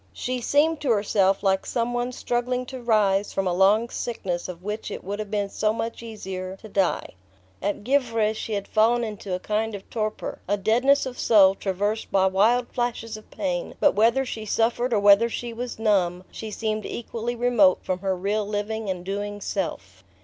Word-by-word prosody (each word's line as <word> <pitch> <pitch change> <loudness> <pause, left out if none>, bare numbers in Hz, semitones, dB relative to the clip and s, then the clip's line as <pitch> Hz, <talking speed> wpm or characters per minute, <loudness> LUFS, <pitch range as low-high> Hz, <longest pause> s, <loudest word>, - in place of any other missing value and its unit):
She 250 0 -3
seemed 300 +5 +2
to 280 - -1
herself 200 -3 +2
like 190 -1 +2
some 240 0 -1
one 245 +1 -1
struggling 250 +1 -1
to 260 0 -8
rise 205 -4 +2
from 195 - -1
a 180 - +1
long 200 +5 +4
sickness 185 -9 -3
of 180 0 -8
which 210 +2 -4
it - - -6
would 200 +3 -4
have 210 -1 -4
been 205 -1 -1
so 215 +2 0
much 230 +1 -4
easier 190 -4 -6
to 220 - -12
die. 195 -3 0 0.5
At 205 +1 -2
Givre 230 -4 +1
she 220 0 -5
had 200 -1 -2
fallen 235 +2 +3
into 205 -4 -4
a - - -4
kind 215 +2 -1
of 195 - -10
torpor, 215 -2 -3
a 205 +2 +1
deadness 250 +8 +3
of 255 -1 -6
soul 195 -4 +6
traversed 205 +3 -2
by 190 -1 +4
wild 220 +6 +3
flashes 240 -3 -3
of 215 - -12
pain; 180 -4 -3
but - - +4
whether 230 +6 +3
she 225 -3 -5
suffered 235 +3 0
or 220 - +3
whether 205 +3 +6
she 235 0 -5
was 245 +1 -5
numb, 185 -5 +1
she 220 - -7
seemed 215 0 -2
equally 235 0 -4
remote 235 -6 +4
from 185 0 -2
her 190 0 -1
real 205 +3 0
living 210 +1 -3
and 180 -1 -4
doing 205 +1 -3
self. 100 - -4
215 Hz, 195 wpm, -25 LUFS, 195-235 Hz, 0.5 s, soul